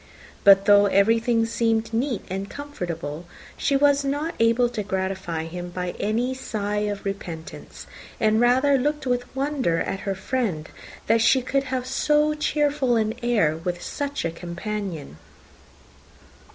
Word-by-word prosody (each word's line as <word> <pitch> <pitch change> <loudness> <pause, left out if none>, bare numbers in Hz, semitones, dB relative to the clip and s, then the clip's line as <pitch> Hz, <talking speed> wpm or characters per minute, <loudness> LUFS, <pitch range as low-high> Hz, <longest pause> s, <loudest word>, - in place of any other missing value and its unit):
But 195 0 +7
though 205 0 +6
everything 225 +4 +3
seemed 225 -1 0
neat 240 -1 -1
and 195 +2 -4
comfortable, 170 - -6 0.3
she 280 - 0
was 285 0 +4
not 290 +4 -2
able 230 +2 +4
to 235 -3 -4
gratify 190 -4 -3
him 175 +2 -6
by 180 0 -3
any 235 +5 0
sigh 210 -4 -2
of 205 -1 -5
repentance; 175 -5 -7 0.3
and 220 +1 +3
rather 260 +3 +4
looked 295 +2 -1
with 245 0 -2
wonder 270 - 0
at 195 - -2
her 195 -1 -3
friend, 190 -6 -2 0.4
that 225 +1 +3
she 260 +3 +4
could 275 +2 0
have 255 -1 -2
so 300 +3 +2
cheerful 295 -4 +1
an 220 -1 +1
air 210 -11 +2
with 175 +1 -3
such 285 - -3
a 165 - 0
companion. 175 - -5
225 Hz, 140 wpm, -24 LUFS, 190-260 Hz, 0.4 s, But